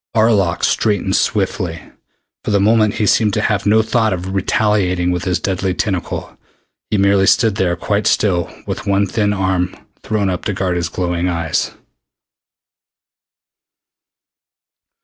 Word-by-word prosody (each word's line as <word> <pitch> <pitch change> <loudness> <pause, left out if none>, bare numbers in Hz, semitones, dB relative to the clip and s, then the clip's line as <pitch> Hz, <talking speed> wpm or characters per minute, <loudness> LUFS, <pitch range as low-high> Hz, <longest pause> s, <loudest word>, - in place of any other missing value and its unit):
Arlok 105 -6 +2
straightened 100 -3 +1
swiftly. 95 -5 -1 0.6
For - - -4
the 100 -1 +2
moment 110 +1 +3
he 105 - 0
seemed 105 0 +2
to - - +1
have 105 -1 0
no 110 +2 +4
thought 110 -2 +1
of 90 +1 -5
retaliating 95 -3 +1
with 90 +1 -2
his 90 -3 0
deadly 95 0 -2
tentacle. 95 -3 -3 0.5
He 105 - +1
merely 100 0 +3
stood 110 -1 +4
there 95 -4 0
quite 100 +4 -1
still 90 -5 +1
with - - -5
one 100 0 +2
thin 105 +1 0
arm 95 -2 -1 0.3
thrown 105 -2 -1
up 90 -2 -2
to 105 - -1
guard 95 -2 -1
his 85 -1 -2
glowing 90 0 -2
eyes. 85 -3 -2
95 Hz, 140 wpm, -17 LUFS, 90-105 Hz, 0.6 s, no